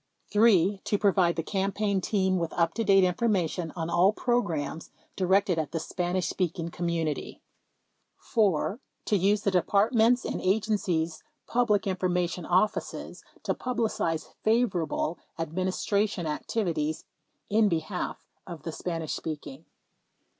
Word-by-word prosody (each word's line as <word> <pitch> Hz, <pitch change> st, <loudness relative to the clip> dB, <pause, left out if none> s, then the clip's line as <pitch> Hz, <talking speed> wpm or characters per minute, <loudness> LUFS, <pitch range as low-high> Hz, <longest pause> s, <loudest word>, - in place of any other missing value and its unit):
3. 205 Hz, -3 st, +4 dB
To 205 Hz, -, 0 dB
provide 190 Hz, -4 st, +3 dB
the 165 Hz, -, -2 dB
campaign 195 Hz, +1 st, 0 dB
team 190 Hz, -2 st, +1 dB
with 165 Hz, -1 st, -3 dB
up 170 Hz, -1 st, +1 dB
to 230 Hz, -, -1 dB
date 195 Hz, -2 st, +5 dB
informa 185 Hz, -1 st, +2 dB
tion 165 Hz, 0 st, -4 dB
on 165 Hz, -2 st, -3 dB
all 175 Hz, +3 st, +4 dB
programs 175 Hz, -, -1 dB, 0.3 s
directed 190 Hz, -1 st, +2 dB
at 155 Hz, -3 st, -3 dB
the 165 Hz, -, 0 dB
Spanish 180 Hz, +2 st, -2 dB
speaking 170 Hz, -2 st, -2 dB
com 170 Hz, 0 st, -4 dB
munity. 165 Hz, -3 st, -2 dB, 0.8 s
4. 205 Hz, -, +1 dB, 0.3 s
To 210 Hz, -, +2 dB
use 200 Hz, +2 st, +2 dB
the 200 Hz, -, +2 dB
Departments 220 Hz, +6 st, +3 dB
and -, -, -3 dB
Agencies 185 Hz, -5 st, 0 dB, 0.2 s
public 235 Hz, -4 st, +2 dB
information 180 Hz, -2 st, -1 dB
offices 185 Hz, +4 st, 0 dB, 0.2 s
to -, -, 0 dB
publicize 225 Hz, -10 st, -2 dB
favorable 215 Hz, -8 st, +1 dB, 0.2 s
Administration 185 Hz, +3 st, -1 dB
activities 155 Hz, -1 st, -2 dB, 0.5 s
in 215 Hz, 0 st, +4 dB
be 165 Hz, -, +2 dB
half 180 Hz, +3 st, -5 dB, 0.2 s
of 170 Hz, -5 st, -8 dB
the 165 Hz, -, -4 dB
Spanish 165 Hz, -1 st, -4 dB
speaking. 160 Hz, -, -6 dB
185 Hz, 130 wpm, -28 LUFS, 165-210 Hz, 0.8 s, date